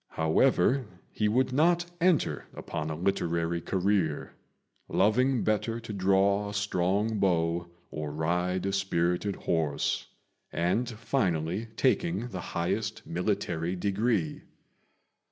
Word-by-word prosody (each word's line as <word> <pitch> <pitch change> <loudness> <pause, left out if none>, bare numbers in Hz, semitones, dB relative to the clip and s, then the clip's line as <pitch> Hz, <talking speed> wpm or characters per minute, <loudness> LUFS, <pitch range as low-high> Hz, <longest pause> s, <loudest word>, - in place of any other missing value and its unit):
However, 125 - +3 0.2
he 105 - 0
would 130 +4 +2
not 170 +5 +3 0.2
enter 165 - +2
upon 80 -2 -4
a 80 - -3
literary 85 -1 0
career, 95 -4 0 0.6
loving 120 +5 +3
better 110 +2 0
to 115 -2 -7
draw 100 +1 +2
a 105 - -6
strong 100 +2 0
bow 85 -2 +1 0.2
or 75 -1 -4
ride 90 +4 0
a 100 - -1
spirited 95 0 0
horse, 80 -4 -1 0.4
and 95 +9 0
finally 105 - -1
taking 135 -1 +1
the 95 -5 -5
highest 100 +6 -2
military 90 -1 -1
degree. 100 -3 0
95 Hz, 110 wpm, -29 LUFS, 85-110 Hz, 0.6 s, However